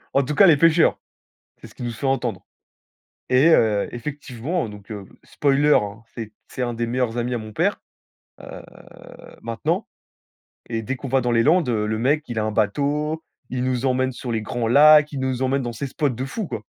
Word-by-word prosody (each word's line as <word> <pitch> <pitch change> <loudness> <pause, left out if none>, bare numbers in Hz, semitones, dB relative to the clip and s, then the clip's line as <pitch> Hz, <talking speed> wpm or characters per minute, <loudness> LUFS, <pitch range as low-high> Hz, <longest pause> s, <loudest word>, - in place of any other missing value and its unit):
En 140 - +5
tout 145 +3 -3
cas, 200 - +7
les 160 -4 +6
pêcheurs, 165 +1 +4 0.6
c'est - - -11
ce - - -19
qui - - -8
nous 120 - -3
fait 125 +5 -4
entendre. 120 -8 -1 0.8
Et 130 +5 +5
heu, 110 -9 +3
effectivement, 140 +4 -4
donc 105 0 -13
heu, 105 -2 -6 0.2
spoiler, 145 +1 +2
hein, 105 +2 -1
c'est 110 -3 -7 0.2
c'est 130 - -5
un 120 - -1
des 120 +1 -2
meilleurs 120 -1 -1
amis 120 +1 -1
à - - -1
mon 110 -1 -9
père, - - 0 0.6
heu, - - -10 0.8
maintenant, 115 -1 -2 0.8
et 115 -1 -3
dès 135 +5 -3
qu'on 135 - -7
va 135 +1 +2
dans 120 0 0
les 115 - +3
Landes, 160 -2 +3
heu, 110 -3 0
le 110 - -1
mec, 145 +7 +1
il 120 -2 -6
a 110 - 0
un 110 - -1
bateau, 145 +9 -1 0.3
il 125 0 -2
nous 130 0 -1
emmène 130 0 +1
sur 120 -1 -6
les 110 - -1
grands 115 +1 -2
lacs, 150 +4 +7
il 140 - -5
nous 130 -1 -2
emmène 135 +1 +1
dans 120 -1 -4
ces 140 +5 -4
spots 145 +2 -1
de 125 +1 -4
fou, 195 +9 -4
quoi. 110 - -6
125 Hz, 210 wpm, -22 LUFS, 115-145 Hz, 0.8 s, cas